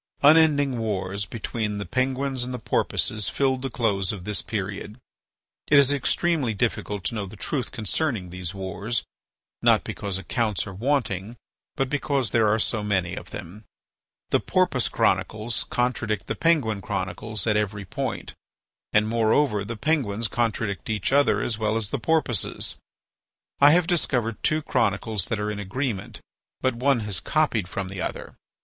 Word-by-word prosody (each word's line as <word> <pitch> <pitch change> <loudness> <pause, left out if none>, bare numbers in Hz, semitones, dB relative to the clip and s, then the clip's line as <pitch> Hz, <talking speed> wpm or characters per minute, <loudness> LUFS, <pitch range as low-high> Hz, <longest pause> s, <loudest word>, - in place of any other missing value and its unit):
Unending 145 -4 +5
wars 100 -2 -2
between 105 -1 -3
the 100 - -4
Penguins 130 0 0
and 125 - -2
the 125 - -3
Porpoises 110 -2 0
filled 130 -2 +1
the 135 - -2
close 100 -6 0
of 95 -4 -7
this 105 +1 -2
period. 100 0 -4 0.7
It 145 - +6
is 140 0 +6
extremely 145 -3 +1
difficult 105 -2 -1
to - - -1
know 105 -3 -3
the 95 - -10
truth 130 +5 -2
concerning 110 - -1
these 90 -2 -4
wars, 95 +3 -2 0.6
not - - +4
because 100 -3 -3
accounts 105 0 -1
are 100 - -7
wanting, 115 -2 -1 0.4
but 135 -3 0
because 140 -3 0
there 115 -2 +4
are 105 +1 +3
so 110 0 0
many 95 -4 0
of - - -7
them. 105 +6 -8 0.7
The - - +4
Porpoise - - +1
Chronicles 110 +1 0
contradict 120 -4 -1
the - - -2
Penguin 130 -12 +2
Chronicles 100 +1 -3
at 110 -2 +2
every 105 -1 -1
point. - - -4 0.6
And, 105 0 +3
moreover, 110 0 +2
the 115 +3 -5
Penguins 115 -6 +1
contradict 110 -6 -1
each 110 +3 0
other 145 0 +4
as 115 -2 -1
well 110 0 +1
as 110 -3 -1
the 140 - -1
Porpoises. 125 - 0 0.8
I 140 - +8
have 170 +3 +5
discovered 125 - 0
two 155 0 +1
chronicles 105 -5 0
that 110 - -1
are 105 0 -1
in 105 - -5
agreement, 105 +1 -3 0.4
but 130 - +1
one 125 +1 +2
has 105 -5 +1
copied 145 - +1
from 100 0 -4
the 95 -1 -5
other. - - -5
110 Hz, 160 wpm, -25 LUFS, 100-130 Hz, 0.8 s, I